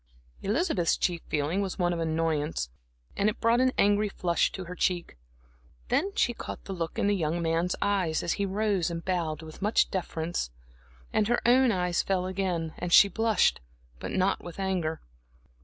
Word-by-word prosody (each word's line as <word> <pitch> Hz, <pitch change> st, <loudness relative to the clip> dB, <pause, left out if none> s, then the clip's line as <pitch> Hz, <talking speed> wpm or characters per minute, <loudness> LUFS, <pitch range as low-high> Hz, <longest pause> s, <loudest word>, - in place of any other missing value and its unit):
Elizabeth's 210 Hz, -, +1 dB
chief 175 Hz, -2 st, 0 dB
feeling 155 Hz, +6 st, 0 dB
was 195 Hz, -2 st, -3 dB
one 175 Hz, -2 st, +1 dB
of 170 Hz, -, -3 dB
annoyance, 160 Hz, -, -1 dB, 0.4 s
and 205 Hz, -, +2 dB
it 215 Hz, -, -5 dB
brought 230 Hz, +1 st, +3 dB
an 255 Hz, 0 st, +3 dB
angry 205 Hz, +1 st, +3 dB
flush 175 Hz, -3 st, +1 dB
to 190 Hz, -, -6 dB
her 180 Hz, 0 st, -7 dB
cheek. 180 Hz, -1 st, -1 dB, 0.7 s
Then 390 Hz, +7 st, +1 dB
she 240 Hz, -, +2 dB
caught -, -, -7 dB
the 195 Hz, -, -6 dB
look 170 Hz, 0 st, -4 dB
in 225 Hz, -, +1 dB
the 205 Hz, 0 st, +3 dB
young 165 Hz, -2 st, -1 dB
man's 165 Hz, +2 st, 0 dB
eyes, 190 Hz, -6 st, +1 dB
as 170 Hz, -, 0 dB
he 200 Hz, -, -1 dB
rose 200 Hz, -3 st, 0 dB
and 170 Hz, 0 st, -5 dB
bowed 165 Hz, -4 st, -1 dB
with 155 Hz, +3 st, -11 dB
much 210 Hz, +3 st, +2 dB
deference; 170 Hz, -, -2 dB, 0.6 s
and 210 Hz, -, +2 dB
her 240 Hz, +1 st, +2 dB
own 255 Hz, 0 st, +5 dB
eyes 180 Hz, -3 st, +1 dB
fell 185 Hz, -2 st, 0 dB
and 185 Hz, -, -3 dB
again 175 Hz, -4 st, -1 dB, 0.2 s
she 200 Hz, +3 st, +8 dB
blushed, 225 Hz, -1 st, +2 dB, 0.4 s
but -, -, -5 dB
not 190 Hz, +1 st, 0 dB
with 175 Hz, +2 st, -9 dB
anger. 180 Hz, -5 st, -1 dB
180 Hz, 180 wpm, -28 LUFS, 165-205 Hz, 0.7 s, she